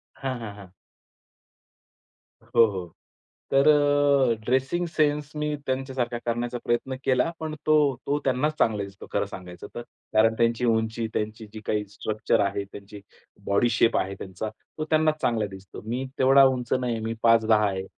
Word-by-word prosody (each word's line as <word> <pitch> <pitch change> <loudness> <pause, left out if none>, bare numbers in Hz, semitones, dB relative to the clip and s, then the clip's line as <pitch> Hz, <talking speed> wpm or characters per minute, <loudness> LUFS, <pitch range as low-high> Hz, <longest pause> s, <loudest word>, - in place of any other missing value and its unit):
हां, 130 -2 -4
हां, 110 -3 -7
हां. 100 -3 -13 1.7
हो, 115 - +4
हो. 95 -5 -4 0.7
तर 135 +1 +5
अ, 145 -3 +4
ड्रेसिंग 130 +8 +1
सेन्स 150 -2 0
मी 150 0 -1
त्यांच्यासारखा 130 -2 -2
करण्याचा 120 +1 -2
प्रयत्न 125 +3 0
केला 130 +4 +2
पण 155 -1 -4
तो 155 - +5 0.3
तो 145 +1 +1
त्यांनाच 135 +4 +1
चांगला 105 -3 +2
दिसतो 100 0 -10
खरं - - +1
सांगायचं 90 -2 -9
तर. 120 - -4 0.3
कारण 110 +1 +4
त्यांची 115 +1 +2
उंची, 110 0 0
त्यांची 110 +1 -3
जी 110 - -7
काही 105 -1 0
स्ट्रक्चर 110 +1 -1
आहे, 100 0 -2
त्यांची 100 +1 -11 0.4
बॉडी 100 +4 +2
शेप 115 0 +3
आहे 95 - -1
त्यांचा, 95 +3 -5
तो 130 +7 -9
त्यांनाच 155 -1 +2
चांगला 115 -3 +1
दिसतो. 95 0 -11
मी 125 +4 -2
तेवढा 135 +1 +7
उंच 130 -3 +2
नाही 125 -2 0
आहे, 110 - -5
मी 115 - -2
5'10" 110 -2 +4
आहे. 95 -1 -4
120 Hz, 160 wpm, -25 LUFS, 105-135 Hz, 1.7 s, तेवढा